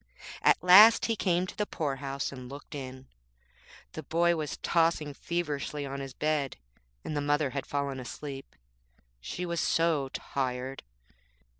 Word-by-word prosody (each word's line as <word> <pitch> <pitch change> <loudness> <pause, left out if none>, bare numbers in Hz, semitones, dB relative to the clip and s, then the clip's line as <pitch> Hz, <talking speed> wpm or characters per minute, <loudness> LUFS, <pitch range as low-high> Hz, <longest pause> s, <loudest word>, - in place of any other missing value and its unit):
At - - +4
last 205 +5 +9
he 225 - 0
came 180 -3 +1
to - - -9
the 210 - -1
poor 145 -5 -2
house 140 0 -3
and 130 -2 -9
looked 140 +4 -10
in. 130 -2 -7 0.9
The 155 - -6
boy 170 +3 +2
was 155 -2 -4
tossing 165 -3 +1
feverishly 150 -3 -3
on 140 0 -5
his 135 -2 -7
bed, 150 -3 -1 0.5
and 155 - -3
the 145 - 0
mother 145 -1 +1
had 140 -1 -4
fallen 140 -2 -2
asleep, 135 +2 -8 0.6
she 180 - -5
was 170 -1 -2
so 160 -5 +1
tired. 130 0 -3
145 Hz, 150 wpm, -29 LUFS, 135-170 Hz, 0.9 s, last